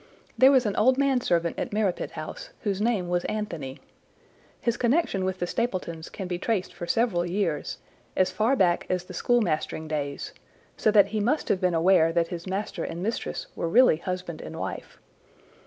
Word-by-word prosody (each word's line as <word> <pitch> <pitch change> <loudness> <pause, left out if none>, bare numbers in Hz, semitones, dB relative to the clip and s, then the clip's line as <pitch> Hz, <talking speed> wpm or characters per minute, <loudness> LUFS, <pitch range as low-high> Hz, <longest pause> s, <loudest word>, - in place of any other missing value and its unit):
There 260 - +7
was 260 -3 +4
an 205 - 0
old 255 +4 +4
manservant 245 -12 +1
at - - -3
Merripit 205 -3 -1
House, - - -7
whose 200 -2 -1
name 215 -5 +1
was 175 0 0
Anthony. 170 -11 -4 0.8
His 235 -1 0
connection 240 - +1
with 185 0 -1
the 175 - -1
Stapletons 175 -6 -3
can 190 - -6
be 175 -1 -3
traced 205 -2 -1
for 175 - -7
several 195 -3 +2
years, 175 -4 -2 0.4
as 185 0 +3
far 220 +8 +2
back 175 -7 +2
as 180 -1 0
the 180 - -11
school 240 +7 +2
mastering 160 -3 -2
days, 145 -2 -3 0.4
so - - +2
that 210 -2 +5
he 220 - -1
must 245 +9 0
have 190 - +1
been 180 -2 +2
aware 165 -1 +4
that 170 -1 +1
his 175 0 -6
master 190 -2 -3
and 170 +2 -5
mistress 225 +3 -3
were 165 - -2
really 240 -3 +6
husband 180 -1 -5
and - - -8
wife. - - -6
185 Hz, 185 wpm, -26 LUFS, 170-220 Hz, 0.8 s, There